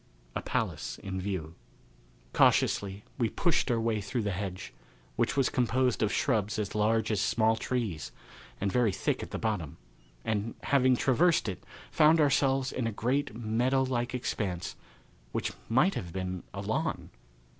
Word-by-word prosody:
A - - -1
Palace - - -2
in 95 -2 -5
View. 90 -5 -3 0.8
Cautiously 100 0 +3 0.2
we 115 -3 +2
pushed 165 +1 +1
our 120 -2 +2
way 115 -2 0
through 105 +4 -2
the 100 - -1
hedge, 95 0 -5 0.4
which - - 0
was 135 - +4
composed 125 0 +1
of 110 - +2
shrubs 110 -6 +1
as 105 -2 -2
large 110 +1 +2
as 105 -3 +1
small 110 +1 +3
trees, 110 - -3 0.5
and 100 -1 0
very 120 -1 +3
thick 95 - -1
at - - -6
the - - -4
bottom, 105 -10 -2 0.5
and, 110 +1 -1
having 130 -2 +4
traversed 150 +5 +3
it, 95 -4 -4 0.3
found 155 +2 +5
ourselves 135 -2 +3
in 125 -3 -2
a - - -1
great 125 +4 -1
meadow 120 +4 +1
like 125 -1 -1
expanse 95 -7 -3 0.6
which - - -1 0.2
might 150 +12 +4
have 85 - -5
been 95 0 -3
a - - -5
lawn. - - -2
110 Hz, 155 wpm, -30 LUFS, 100-130 Hz, 0.8 s, found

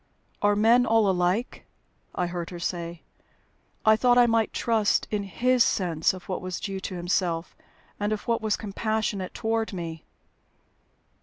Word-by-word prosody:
"Are 205 0 +3
men 230 +4 +4
all 225 -2 +4
alike?" 185 +5 0 0.5
I 180 - 0
heard 175 -1 -4
her 175 - -7
say. 170 -1 -4 0.8
"I 220 0 +7
thought 245 +2 +3
I 245 - +7
might 230 -2 +2
trust 220 -3 +1
in 210 -1 0
his 240 +6 +2
sense 165 -4 +1
of 185 -1 -11
what 185 - -3
was 185 -1 -4
due 195 -1 -4
to 190 0 -5
himself 175 -1 -1 0.4
and 205 +1 -1
of 215 - -3
what 230 -1 +1
was 215 -1 0
compassionate 210 -2 -2
toward 225 -1 -1
me." 165 -3 -6
205 Hz, 155 wpm, -26 LUFS, 180-225 Hz, 0.8 s, I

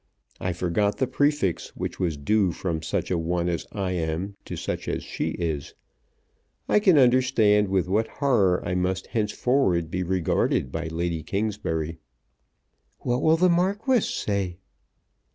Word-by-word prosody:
I 90 - -1
forgot 90 +4 0
the 130 - +2
prefix 145 - 0
which - - -5
was 85 -5 -1
due 100 +5 +2
from 80 -3 -3
such 80 - -2
a 90 - +1
one 85 +1 -1
as 85 -2 -2
I 100 -3 -2
am 85 +3 -2
to - - -5
such - - -4
as - - -2
she - - -3
is. 80 -5 -3 0.9
I - - +4
can 190 -6 +5
understand 120 -5 +4
with 95 -2 +1
what 105 +4 +1
horror 105 -11 +1
I 90 - -1
must 90 0 -1
henceforward 105 - +1
be 90 - -1
regarded 90 -6 0
by 80 +2 -3
Lady 85 0 -2
Kingsbury." 80 -4 -2 1.0
"What 125 +2 0
will 160 +1 +4
the 180 +2 +4
Marquis 200 +9 +2
say?" 100 - -2
95 Hz, 150 wpm, -25 LUFS, 85-120 Hz, 1.0 s, can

